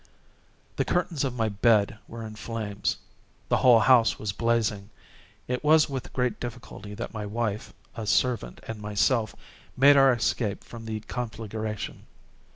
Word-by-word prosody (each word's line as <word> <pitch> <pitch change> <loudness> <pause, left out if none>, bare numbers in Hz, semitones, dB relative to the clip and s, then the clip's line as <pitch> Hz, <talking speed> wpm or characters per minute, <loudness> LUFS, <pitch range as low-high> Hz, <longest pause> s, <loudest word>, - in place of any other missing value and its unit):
The - - +2
curtains 175 -5 -1
of 130 -3 -2
my 115 -2 0
bed 110 0 +2
were 115 -1 -7
in 110 - -8
flames. 105 -2 -3 0.5
The - - +3
whole 120 -3 +6
house 120 -1 +5
was 105 -1 -3
blazing. 110 -2 0 0.6
It 125 +2 -2
was 155 0 +5
with 135 -2 -5
great 125 -2 -1
difficulty 105 -3 -8
that - - -6
my 105 -2 -4
wife, 110 -1 -3 0.2
a 110 -2 -5
servant, 115 - 0
and 110 -1 -6
myself, 110 +2 +1 0.4
made 140 +2 +7
our 135 -1 +7
escape 115 -3 -1
from 115 -1 -10
the 110 -1 -4
conflagration. 110 -2 -5
115 Hz, 150 wpm, -27 LUFS, 105-125 Hz, 0.6 s, made